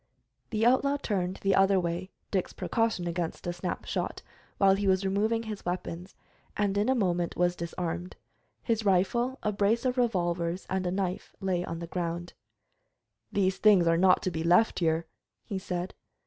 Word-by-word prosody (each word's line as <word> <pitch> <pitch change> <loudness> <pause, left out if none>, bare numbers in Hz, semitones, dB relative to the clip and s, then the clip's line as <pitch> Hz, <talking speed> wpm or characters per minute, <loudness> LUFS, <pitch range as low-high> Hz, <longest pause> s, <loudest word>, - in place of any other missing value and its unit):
The 220 0 0
outlaw 280 +3 +3
turned 190 -8 -2
the 195 0 +3
other 195 0 +4
way, 175 +1 -3 0.2
Dick's 190 -3 -1
precaution 225 -6 0
against 170 -1 -3
a 175 - -1
snap 175 +1 -4
shot, - - -3 0.3
while 195 -1 +5
he 200 +1 0
was 190 0 +2
removing 215 +4 +1
his 215 -3 -6
weapons, 175 0 -4 0.4
and 205 -1 +1
in 205 +4 +1
a 265 - +3
moment 175 -6 0
was 175 0 +2
disarmed. 170 +1 -4 0.5
His 225 -2 0
rifle, 225 +7 +2
a 210 - +1
brace 210 +4 +1
of 250 0 +1
revolvers, 175 -6 0
and 190 -1 0
a - - 0
knife 185 -1 -3
lay 185 -2 0
on 165 -1 -5
the 170 - -5
ground. 175 0 -4 1.0
"These 190 -2 +1
things 205 -5 +6
are 165 0 +4
not 180 +2 +4
to 185 - 0
be 160 -1 -3
left 180 +7 +4
here," 165 -1 +1 0.4
he 195 - -4
said. 180 0 -4
185 Hz, 175 wpm, -29 LUFS, 175-205 Hz, 1.0 s, things